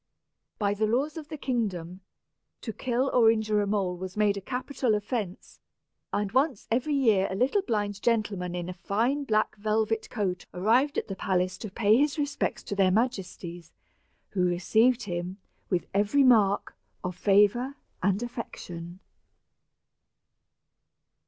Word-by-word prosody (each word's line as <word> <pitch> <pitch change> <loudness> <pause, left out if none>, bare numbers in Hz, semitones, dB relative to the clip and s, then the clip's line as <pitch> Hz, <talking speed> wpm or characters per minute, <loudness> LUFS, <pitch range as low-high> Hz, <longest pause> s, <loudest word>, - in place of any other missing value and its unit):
By 205 -2 +1
the 215 +1 0
laws 270 +7 0
of 315 -3 -7
the 310 0 -6
kingdom, 195 - -2 0.6
to 225 - -5
kill 255 +4 0
or 230 -3 +6
injure 215 -2 +2
a 205 - -1
mole 195 -3 0
was 185 +2 -7
made 210 -1 +3
a 200 - -5
capital 250 0 -1
offence; 210 -3 -4 0.5
and 205 -1 -1
once 265 -1 +1
every 260 +6 +1
year 220 -8 +3
a 190 - -3
little 260 - +2
blind 205 - -2
gentleman 205 -6 0
in 175 -1 -4
a 185 - -4
fine 235 +10 0
black 215 -3 +1
velvet 220 +1 0
coat 190 -6 -2
arrived 235 +10 +2
at - - -1
the 195 - -4
palace 185 -1 0
to 215 - -6
pay 210 +2 +3
his 290 +3 +2
respects 290 -1 -2
to 200 - -4
their 195 -2 +4
majesties, 185 -6 -2 0.6
who 185 -3 0
received 220 +8 +3
him 180 0 -4 0.3
with 180 -2 0
every 210 +8 +3
mark 215 -6 +4 0.3
of 180 -1 -3
favor 205 +8 +3 0.3
and 200 +4 +1
affection. 175 -7 -7
210 Hz, 145 wpm, -28 LUFS, 190-245 Hz, 0.6 s, or